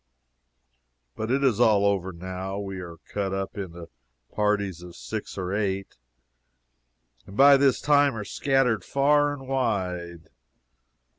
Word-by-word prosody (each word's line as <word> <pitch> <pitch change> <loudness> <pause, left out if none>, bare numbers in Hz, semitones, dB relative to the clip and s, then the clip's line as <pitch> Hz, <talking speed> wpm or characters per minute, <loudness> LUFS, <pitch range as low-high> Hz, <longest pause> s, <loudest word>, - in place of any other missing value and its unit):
But 110 - -4
it 135 +2 +1
is 125 -7 +2
all 105 -2 +4
over 95 -2 0
now. 95 +2 -6
We 95 -2 -5
are 85 -2 -8
cut 100 -2 -2
up 95 0 -4
into 85 -4 -7 0.5
parties 100 -4 0
of 90 -1 -11
six - - -6
or 95 0 -3
eight, 100 -2 -2 1.3
and 100 - -11
by 140 +1 +8
this 135 -2 +3
time 145 -3 +3
are 105 -2 -5
scattered 135 -4 +1
far 145 +1 +2
and 135 -2 -8
wide. 90 -10 -2
100 Hz, 135 wpm, -26 LUFS, 95-135 Hz, 1.3 s, by